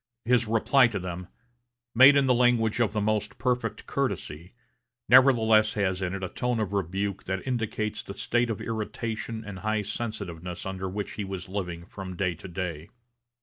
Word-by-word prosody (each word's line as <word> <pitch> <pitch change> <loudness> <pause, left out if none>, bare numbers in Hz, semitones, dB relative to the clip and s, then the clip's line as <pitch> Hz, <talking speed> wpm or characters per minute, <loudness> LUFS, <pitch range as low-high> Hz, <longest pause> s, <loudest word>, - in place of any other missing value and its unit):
His 120 -1 +3
reply 115 +4 +4
to 110 -4 -4
them, 90 -1 -5 0.7
made 130 +4 +8
in 140 -1 +4
the 130 - +4
language 120 -2 +2
of 115 -4 +2
the 105 - -1
most 105 0 -1
perfect 125 -1 -1
courtesy 85 +8 -3 0.5
nevertheless 115 -4 +6
has 95 -3 0
in 95 0 -2
it 95 - -5
a 95 - -2
tone 125 -2 -1
of 105 -2 -2
rebuke 100 +1 -2
that 95 0 -3
indicates 110 -4 -2
the 100 - -9
state 120 0 0
of 110 - -2
irritation 110 0 -4
and 100 -2 -7
high 110 +1 -1
sensitiveness 95 -5 -5
under 95 0 -4
which 100 +2 -4
he 105 - -4
was 95 -2 -6
living 90 -3 -4
from 95 -1 -8
day 90 0 0
to 85 - -10
day. 85 -3 -5
105 Hz, 175 wpm, -27 LUFS, 95-115 Hz, 0.7 s, made